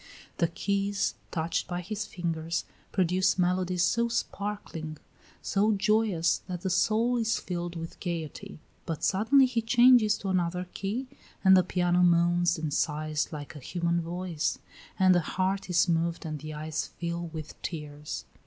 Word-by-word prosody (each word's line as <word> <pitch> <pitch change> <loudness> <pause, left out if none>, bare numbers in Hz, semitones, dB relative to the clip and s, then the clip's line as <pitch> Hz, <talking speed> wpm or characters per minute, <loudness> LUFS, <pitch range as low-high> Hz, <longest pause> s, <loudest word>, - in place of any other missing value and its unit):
The 170 - +3
keys, 200 +3 -1 0.2
touched 165 0 -1
by 175 -1 -3
his 210 +3 -4
fingers, 165 -3 -3 0.3
produce 185 +1 +2
melodies 180 0 +1
so 235 +5 +2
sparkling, 200 -8 -4 0.5
so 205 +2 +2
joyous, 210 -4 +2
that 180 -2 -4
the 190 - -1
soul 220 +6 +2
is 225 -1 +1
filled 175 -1 -4
with 165 0 -7
gayety; 165 -4 -5 0.3
but 165 -3 -4
suddenly 225 +8 +4
he 250 -2 0
changes 240 -2 +5
to 195 - -4
another 180 0 0
key 215 +7 -3 0.4
and 190 -1 +8
the 185 - +7
piano 180 0 +1
moans 175 0 +3
and 155 -2 -3
sighs 155 -1 -1
like 150 0 -7
a - - -7
human 170 +4 -1
voice, 170 -1 -2 0.4
and 185 -1 +5
the 175 - +4
heart 190 +4 -1
is 180 +1 +3
moved 170 0 0
and 155 -2 -4
the 155 +2 -7
eyes 155 0 -3
fill 170 0 -3
with 160 -2 -8
tears. 150 -3 -6
180 Hz, 155 wpm, -28 LUFS, 165-200 Hz, 0.5 s, and